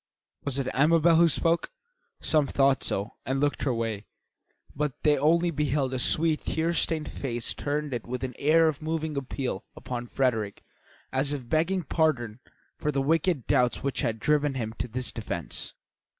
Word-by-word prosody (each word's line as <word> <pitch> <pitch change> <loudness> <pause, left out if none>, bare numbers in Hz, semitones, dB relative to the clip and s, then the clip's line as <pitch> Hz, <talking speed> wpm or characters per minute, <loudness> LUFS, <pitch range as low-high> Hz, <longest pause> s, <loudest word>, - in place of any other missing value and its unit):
Was 140 -2 -1
it 135 -2 -1
Amabel 160 +4 +5
who 170 +1 +6
spoke? 165 +1 +1 0.5
Some 150 -3 +2
thought 135 -1 +3
so 100 +2 -2
and 135 +1 -1
looked 145 +1 0
her 135 - +2
way, 115 -3 -3 0.7
but 150 -1 -1
they 150 -1 +5
only 165 +5 +3
beheld 145 -3 0
a 130 - -1
sweet, 155 +4 +2
tear 165 +2 0
stained 160 -2 -1
face 120 -4 -3
turned 145 -2 -2
with 125 +1 -4
an 130 -1 -3
air 160 +3 +5
of 155 -2 -1
moving 160 -1 -2
appeal 130 -5 -3
upon 120 -1 -5
Frederick 115 -6 -1 0.5
as 135 +2 +1
if 130 -4 -5
begging 170 +6 +1
pardon 130 -8 0 0.4
for 150 - 0
the 140 - 0
wicked 155 0 +1
doubts 125 -1 +2
which 140 -1 -1
had 115 -1 -1
driven 150 +1 +2
him 110 -3 -3
to - - -2
this 125 +2 -3
defence. 85 -8 -5
140 Hz, 165 wpm, -27 LUFS, 125-155 Hz, 0.7 s, who